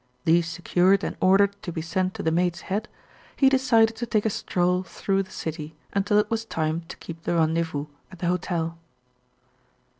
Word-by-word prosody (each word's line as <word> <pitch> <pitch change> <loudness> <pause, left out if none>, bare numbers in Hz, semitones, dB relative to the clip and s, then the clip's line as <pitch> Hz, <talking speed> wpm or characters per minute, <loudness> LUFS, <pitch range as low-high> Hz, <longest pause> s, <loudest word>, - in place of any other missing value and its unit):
These 170 +1 +4
secured 180 +3 +2
and - - -3
ordered 195 +2 +4
to 185 - -5
be 160 -1 -4
sent 185 +3 -1
to - - -5
the 160 - +1
Maid's 175 0 +1
Head, 210 +4 -3 0.5
he 270 - +5
decided 230 -4 +3
to 240 - -3
take 215 -2 +1
a 220 - +2
stroll 180 -1 0
through 195 +1 -1
the 190 - -8
city 155 -1 -6 0.2
until 205 +1 +2
it 210 +1 +2
was 225 0 0
time 160 -6 -2
to - - -9
keep 165 -1 -9
the 175 - -1
rendezvous 160 -2 +1 0.3
at 185 - -11
the 175 - -4
hotel. 170 -2 -1
180 Hz, 185 wpm, -25 LUFS, 165-200 Hz, 0.5 s, he